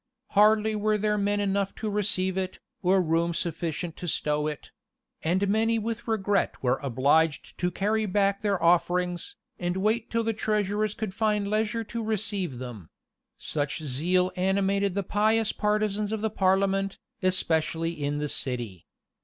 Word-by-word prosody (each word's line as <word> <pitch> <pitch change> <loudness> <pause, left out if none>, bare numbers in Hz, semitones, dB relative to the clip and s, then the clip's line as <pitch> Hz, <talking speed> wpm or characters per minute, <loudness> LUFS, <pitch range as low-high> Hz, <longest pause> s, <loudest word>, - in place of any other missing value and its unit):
Hardly 215 +1 +4
were 215 0 +1
there 210 0 +1
men 205 0 +1
enough 200 -1 0
to 220 - -4
receive 195 -3 +1
it, 190 -1 -2 0.2
or 185 0 +3
room 165 +1 +1
sufficient 170 -1 -3
to 175 - -6
stow 150 -1 0
it; 150 -1 -6 0.5
and 185 +5 +1
many 225 +3 +2
with 230 +2 -4
regret 205 -2 +1
were 125 +1 +2
obliged 140 +4 +1
to 180 - +1
carry 215 +4 0
back 200 0 +1
their 200 -3 +1
offerings, 175 - +1 0.2
and 175 +1 -1
wait 215 +4 0
till 230 0 0
the 225 0 0
treasurers 210 -1 0
could 220 -4 -4
find 210 -1 +1
leisure 215 +2 0
to 230 +1 -5
receive 205 - -1
them; 120 -9 -8 0.5
such 145 +1 -2
zeal 175 +7 +1
animated 195 +1 +1
the 200 - 0
pious 215 +3 +2
partisans 210 0 0
of 220 -1 -2
the 220 -1 0
parliament, 195 0 +1 0.2
especially 165 -3 +1
in 145 -3 -2
the 150 0 -1
city. 120 - -4
195 Hz, 155 wpm, -27 LUFS, 170-210 Hz, 0.5 s, Hardly